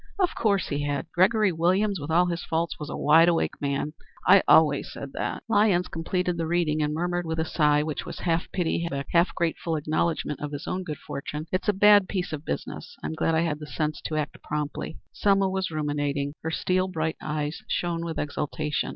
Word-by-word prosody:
"Of 370 Hz, -3 st, +2 dB
course 200 Hz, -4 st, +1 dB
he 145 Hz, 0 st, -1 dB
had. 145 Hz, +1 st, -1 dB
Gregory 205 Hz, +2 st, +4 dB
Williams, 185 Hz, +4 st, +1 dB
with 145 Hz, +1 st, -6 dB
all 175 Hz, +3 st, +4 dB
his 170 Hz, -1 st, -2 dB
faults, 165 Hz, -1 st, -2 dB
was 150 Hz, 0 st, -6 dB
a -, -, -4 dB
wide 165 Hz, +3 st, +6 dB
awake 170 Hz, -, 0 dB
man. 140 Hz, +1 st, -1 dB, 0.3 s
I 195 Hz, +1 st, +7 dB
always 150 Hz, -3 st, +5 dB
said 140 Hz, 0 st, -8 dB
that." -, -, -3 dB
Lyons 205 Hz, -5 st, +3 dB
completed 180 Hz, +2 st, -1 dB
the 165 Hz, -1 st, -1 dB
reading 160 Hz, -2 st, +1 dB
and 150 Hz, 0 st, +1 dB
murmured 175 Hz, +3 st, -1 dB
with 160 Hz, 0 st, -2 dB
a 160 Hz, -, +1 dB
sigh, 150 Hz, -2 st, +3 dB
which 150 Hz, -2 st, -3 dB
was -, -, -7 dB
half 170 Hz, -1 st, -1 dB
pity, 170 Hz, -1 st, -1 dB, 0.2 s
half 170 Hz, +1 st, +3 dB
grateful 165 Hz, -1 st, -1 dB
acknowledgment 155 Hz, 0 st, -1 dB
of 150 Hz, 0 st, -5 dB
his 145 Hz, -, -5 dB
own 185 Hz, -, -2 dB
good 155 Hz, -5 st, -5 dB
fortune 150 Hz, +2 st, -6 dB
"It's 185 Hz, +3 st, 0 dB
a -, -, +4 dB
bad 205 Hz, 0 st, +6 dB
piece 180 Hz, -4 st, -2 dB
of 150 Hz, -1 st, -5 dB
business. -, -, -5 dB
I'm -, -, -3 dB
glad 160 Hz, +1 st, +1 dB
I 160 Hz, -, +3 dB
had 155 Hz, -3 st, -1 dB
the 150 Hz, -, -8 dB
sense 150 Hz, -1 st, -2 dB
to 155 Hz, -, -2 dB
act 150 Hz, 0 st, -3 dB
promptly." 150 Hz, +1 st, -4 dB, 0.2 s
Selma 195 Hz, -1 st, +3 dB
was 190 Hz, 0 st, -1 dB
ruminating. 145 Hz, -2 st, -1 dB
Her 160 Hz, -, -3 dB
steel 185 Hz, +3 st, 0 dB
bright 160 Hz, -3 st, -2 dB
eyes 150 Hz, 0 st, -3 dB
shone 170 Hz, -1 st, -1 dB
with 165 Hz, -1 st, -4 dB
exultation. 150 Hz, 0 st, -2 dB
160 Hz, 205 wpm, -26 LUFS, 150-180 Hz, 0.3 s, I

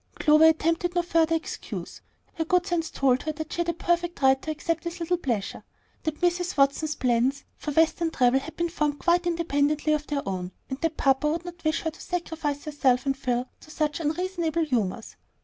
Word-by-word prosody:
Clover 305 Hz, +1 st, +5 dB
attempted 330 Hz, +2 st, +1 dB
no 350 Hz, -, +2 dB
further 330 Hz, -1 st, +2 dB
excuse. 325 Hz, -, -6 dB, 0.3 s
Her 325 Hz, -, -1 dB
good 360 Hz, +2 st, +2 dB
sense 335 Hz, -4 st, -1 dB
told 260 Hz, -2 st, +2 dB
her 310 Hz, -, -2 dB
that 310 Hz, 0 st, -6 dB
she -, -, -5 dB
had 345 Hz, 0 st, +1 dB
a -, -, +1 dB
perfect 345 Hz, 0 st, -1 dB
right 265 Hz, 0 st, +5 dB
to -, -, -6 dB
accept 325 Hz, +2 st, -2 dB
this 340 Hz, 0 st, -5 dB
little 345 Hz, +1 st, 0 dB
pleasure; 230 Hz, -, -3 dB, 0.4 s
that 310 Hz, -1 st, -4 dB
Mrs. 355 Hz, 0 st, 0 dB
Watson's 285 Hz, +2 st, +2 dB
plans 255 Hz, +3 st, +1 dB
for -, -, -6 dB
Western 325 Hz, +2 st, +2 dB
travel 255 Hz, -3 st, +3 dB
had 320 Hz, +4 st, -10 dB
been 340 Hz, 0 st, 0 dB
formed 295 Hz, -3 st, -1 dB
quite 350 Hz, +2 st, +2 dB
independently 305 Hz, -3 st, +1 dB
of 300 Hz, 0 st, -1 dB
their 285 Hz, -5 st, -2 dB
own, 185 Hz, -1 st, -3 dB, 0.2 s
and 265 Hz, -, -4 dB
that 325 Hz, -1 st, -1 dB
papa 270 Hz, +2 st, +2 dB
would 335 Hz, +2 st, -3 dB
not 345 Hz, -1 st, -9 dB
wish 310 Hz, 0 st, +1 dB
her 320 Hz, -, -2 dB
to -, -, -15 dB
sacrifice 320 Hz, -5 st, -3 dB
herself 270 Hz, -4 st, +1 dB
and 275 Hz, -1 st, +1 dB
Phil 250 Hz, -2 st, -1 dB
to -, -, -17 dB
such 305 Hz, 0 st, -1 dB
unreasonable 335 Hz, 0 st, -1 dB
humors. 230 Hz, -5 st, -2 dB
310 Hz, 200 wpm, -26 LUFS, 275-335 Hz, 0.4 s, Clover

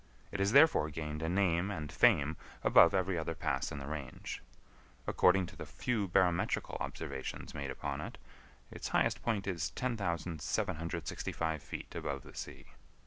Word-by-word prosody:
It 100 Hz, -, -4 dB
has 100 Hz, +1 st, +3 dB
therefore 140 Hz, -, +6 dB
gained 75 Hz, 0 st, -4 dB
a 80 Hz, -, -1 dB
name 90 Hz, 0 st, +2 dB
and 80 Hz, -7 st, -4 dB
fame 75 Hz, +2 st, +4 dB, 0.3 s
above 85 Hz, -, +7 dB
every 95 Hz, -2 st, +1 dB
other 80 Hz, +1 st, -3 dB
pass -, -, -1 dB
in 75 Hz, -, -5 dB
the 70 Hz, -, -5 dB
range. 70 Hz, -3 st, -5 dB, 0.6 s
According 90 Hz, 0 st, +4 dB
to 100 Hz, +4 st, -11 dB
the 80 Hz, -, -7 dB
few 100 Hz, -, -1 dB
barometrical 90 Hz, -1 st, +2 dB
observations 65 Hz, -, -5 dB
made 70 Hz, -2 st, -4 dB
upon 70 Hz, +1 st, -3 dB
it, -, -, -7 dB, 0.5 s
its -, -, -5 dB
highest -, -, +2 dB
point 110 Hz, -4 st, 0 dB
is 85 Hz, -5 st, -1 dB
10,765 85 Hz, -, -2 dB
feet -, -, -7 dB
above 70 Hz, -2 st, -3 dB
the -, -, -13 dB
sea. -, -, -7 dB
85 Hz, 150 wpm, -34 LUFS, 75-95 Hz, 0.6 s, above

